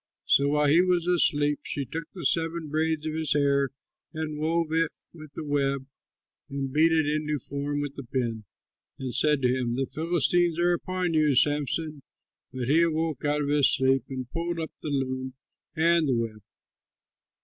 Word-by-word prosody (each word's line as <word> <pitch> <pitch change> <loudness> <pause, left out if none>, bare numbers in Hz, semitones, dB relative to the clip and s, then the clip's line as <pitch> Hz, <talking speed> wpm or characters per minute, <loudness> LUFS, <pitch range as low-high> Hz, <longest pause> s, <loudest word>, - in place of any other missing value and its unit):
So 140 - +4
while 150 +1 +2
he 160 +5 +6
was 180 -2 +1
asleep, 150 -4 +2
she 140 - -4
took 160 +5 -5
the 175 -5 -6
seven 165 +1 0
braids 155 0 0
of 155 - -2
his 155 -2 0
hair 140 -1 +2 0.5
and 155 -1 -4
wove 165 +1 0
it 165 0 +2 0.2
with 155 -3 -12
the - - -6
web 140 -2 0 0.6
and 135 -1 -4
beat 160 +2 +4
it 160 -1 +3
into 150 0 -1
form 145 +2 -3
with 145 -1 -4
the 140 - -8
pin, 115 -3 -3 0.5
and 130 -2 -5
said 140 +2 +2
to 125 0 +3
him, 120 -2 -1
"The 135 +1 0
Philistines 170 +2 +1
are 175 +1 +3
upon 180 0 -2
you, 155 -3 +3
Samson!" 150 +2 0 0.5
But 125 -2 -4
he 155 +5 +4
awoke 160 -3 0
out 145 0 +1
of 140 - -2
his 145 -1 +4
sleep 135 0 +2
and 130 -2 -5
pulled 170 0 -3
up 160 - -4
the 155 - -4
loom 130 -2 -2 0.4
and 165 0 +3
the 130 - +2
web. 115 -2 -3
150 Hz, 180 wpm, -27 LUFS, 135-160 Hz, 0.6 s, he